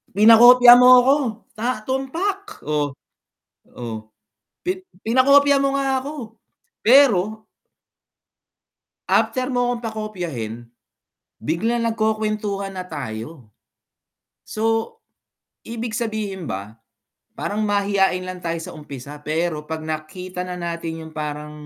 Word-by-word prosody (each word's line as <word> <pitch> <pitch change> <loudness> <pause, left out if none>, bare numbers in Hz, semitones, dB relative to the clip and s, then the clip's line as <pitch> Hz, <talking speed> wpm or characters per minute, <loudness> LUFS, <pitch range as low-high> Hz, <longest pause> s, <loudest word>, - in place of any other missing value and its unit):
Pinakopya 240 +3 +9
mo 250 - +7 0.2
ako, 270 +3 +5 0.4
sa 230 0 -3
tumpak, 375 +11 -3
oh 145 -2 -2 0.8
oh, 110 -2 -7 0.5
pin 365 +1 -2 0.2
pinakopya 280 +4 +4
mo 275 0 0
nga 270 -1 +1
ako, 260 -5 -8 0.4
pero 220 -4 +4 1.6
After 255 0 +1
mo 245 -1 0
akong 240 - -6
pakopyahin, 175 - -5 0.7
biglang 225 - -1
nagkukuwentuhan 215 -3 -1
na 185 -1 -7
tayo, 125 -3 -7 0.9
so 225 - -1 0.7
ibig 230 0 -5
sabihin 215 - -4
ba 100 +4 -7 0.6
parang 205 - -3
mahiyain 200 -2 +1
lang 185 0 -7
tayo 170 -1 -3
sa - - -8
umpisa, 145 -1 -10
pero 155 0 -3
pag 160 -1 -5
nakita 180 +4 -6
na 180 - -5
natin 170 -2 -5
yung 160 - -11
parang, 150 0 -5
205 Hz, 105 wpm, -21 LUFS, 160-240 Hz, 1.6 s, Pinakopya